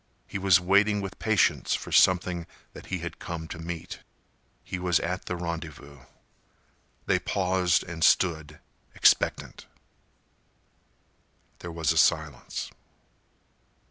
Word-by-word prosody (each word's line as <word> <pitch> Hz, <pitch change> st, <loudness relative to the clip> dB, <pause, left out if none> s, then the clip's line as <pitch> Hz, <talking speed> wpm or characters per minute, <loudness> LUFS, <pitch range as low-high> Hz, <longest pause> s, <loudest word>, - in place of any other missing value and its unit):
He 95 Hz, -, -5 dB
was 95 Hz, -2 st, +5 dB
waiting 100 Hz, +3 st, +3 dB
with 95 Hz, -1 st, -7 dB
patience 110 Hz, -4 st, +2 dB
for -, -, -7 dB
something 90 Hz, -2 st, +3 dB, 0.3 s
that -, -, -12 dB
he 90 Hz, -2 st, -4 dB
had 85 Hz, -, -7 dB
come 85 Hz, -2 st, -6 dB
to 80 Hz, -, -7 dB
meet. 85 Hz, 0 st, -7 dB, 0.6 s
He 90 Hz, -, -5 dB
was 90 Hz, -2 st, +2 dB
at 90 Hz, +3 st, -4 dB
the 90 Hz, -, -3 dB
rendezvous. 80 Hz, -4 st, -7 dB, 1.1 s
They -, -, +2 dB
paused 90 Hz, -2 st, +1 dB
and 85 Hz, -1 st, -5 dB
stood, 80 Hz, -4 st, +2 dB, 0.4 s
expectant. -, -, +2 dB, 1.9 s
There 85 Hz, -, -7 dB
was 80 Hz, -1 st, 0 dB
a 80 Hz, -, +2 dB
silence. 75 Hz, -7 st, 0 dB
85 Hz, 115 wpm, -27 LUFS, 80-95 Hz, 1.9 s, was